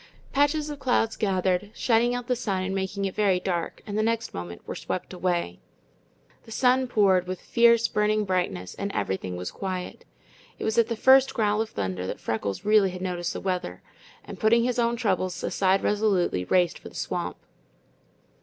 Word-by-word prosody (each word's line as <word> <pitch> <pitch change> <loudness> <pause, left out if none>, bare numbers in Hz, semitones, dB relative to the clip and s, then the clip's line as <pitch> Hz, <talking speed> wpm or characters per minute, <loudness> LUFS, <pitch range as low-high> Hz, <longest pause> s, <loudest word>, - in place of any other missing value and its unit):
Patches 290 +2 +2
of 290 - -7
clouds 245 -4 +1
gathered, 190 -1 0
shutting 240 +1 +2
out 245 -1 -4
the 250 - 0
sun 195 -6 -2
and 190 +1 -2
making 195 +1 -2
it 190 - -2
very 195 -4 +2
dark, 175 -2 -3
and 205 -2 -5
the 215 - +2
next 230 +1 -1
moment 85 0 -7
were - - -4
swept 185 - -5
away. 175 - -1 0.9
The 225 - -13
sun 255 +2 +3
poured 195 -6 +3
with 185 0 -4
fierce, 235 -1 +4
burning 210 0 +1
brightness, 175 - -2
and 200 0 -4
everything 95 -1 -2
was 90 0 -5
quiet. 185 -2 -5 0.5
It - - -6
was 220 +1 +1
at 230 - +4
the 230 - -2
first 265 +3 +5
growl 210 -2 +2
of 220 - -3
thunder 95 -2 -3
that - - -5
Freckles 105 - -3
really 210 -2 +5
had 180 0 -7
noticed 175 -2 -2
the - - -4
weather, 180 - -3 0.4
and - - -9
putting 230 +2 +4
his 245 0 0
own 235 0 +2
troubles 185 -6 -1
aside 190 0 +1
resolutely, 200 - +1
raced 180 - +2
for - - -10
the - - -19
swamp. - - -3
200 Hz, 185 wpm, -26 LUFS, 180-230 Hz, 0.9 s, first